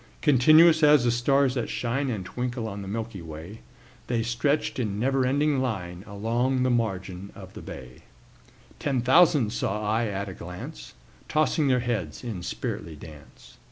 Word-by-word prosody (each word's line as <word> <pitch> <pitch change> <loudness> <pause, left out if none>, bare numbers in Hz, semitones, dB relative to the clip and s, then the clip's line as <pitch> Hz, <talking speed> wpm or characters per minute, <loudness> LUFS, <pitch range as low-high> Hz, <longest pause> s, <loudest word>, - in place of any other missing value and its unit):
Continuous 155 +4 +6
as 150 -3 +6
the 120 - +3
stars 135 +3 +2
that 120 -3 -2
shine 130 +3 -1
And 105 -7 -3
twinkle 125 +1 -3
on 100 -1 -6
the 95 - -7
milky 110 -1 -5
way, 80 +6 -9 0.5
The 115 -2 0
stretched 135 +6 0
in 105 -4 -2
never 130 +1 +1
ending 145 +1 +2
line 95 -8 -3
Along 120 +6 0
the 130 - +2
margin 95 -5 -2
of - - -12
a - - -8
bay: 65 -2 -10 0.8
Ten 135 -4 0
thousand 130 -3 +4
saw 105 -2 -2
I 110 +2 +1
at 100 -1 -3
a 95 - -6
glance, 90 0 -9 0.3
Tossing 155 -1 +2
their 125 -2 +3
heads 110 -10 -3
in 110 -7 -5
sprightly 85 -2 -5
dance. 75 -1 -14
120 Hz, 160 wpm, -26 LUFS, 100-130 Hz, 0.8 s, Continuous